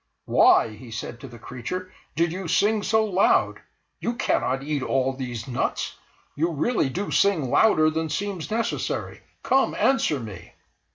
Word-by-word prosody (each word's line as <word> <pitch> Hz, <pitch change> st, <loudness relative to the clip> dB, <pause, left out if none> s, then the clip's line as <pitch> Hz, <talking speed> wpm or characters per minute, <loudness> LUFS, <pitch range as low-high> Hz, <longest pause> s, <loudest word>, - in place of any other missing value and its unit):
"Why," -, -, +5 dB
he 110 Hz, +3 st, -12 dB
said 115 Hz, +1 st, -6 dB
to 135 Hz, -, -9 dB
the 120 Hz, -1 st, -12 dB
creature, 130 Hz, +11 st, -6 dB, 0.2 s
"did 165 Hz, 0 st, +1 dB
you 185 Hz, +1 st, -5 dB
sing 205 Hz, +6 st, +2 dB
so 220 Hz, +1 st, +2 dB
loud? 195 Hz, -2 st, +2 dB, 0.4 s
You 235 Hz, -, -2 dB
cannot 135 Hz, -, 0 dB
eat 145 Hz, -1 st, -2 dB
all 135 Hz, 0 st, 0 dB
these 125 Hz, -3 st, -6 dB
nuts. 125 Hz, -2 st, -2 dB, 0.4 s
You 165 Hz, +4 st, 0 dB
really 165 Hz, -, 0 dB
do 195 Hz, +9 st, -4 dB
sing 160 Hz, -11 st, +2 dB
louder 155 Hz, -8 st, +4 dB
than 160 Hz, 0 st, -2 dB
seems 190 Hz, +1 st, -3 dB
necessary; 225 Hz, +1 st, -2 dB, 0.2 s
come, 270 Hz, +1 st, +2 dB
answer 265 Hz, -, +2 dB
me!" 105 Hz, -7 st, -9 dB
155 Hz, 155 wpm, -24 LUFS, 130-200 Hz, 0.4 s, Why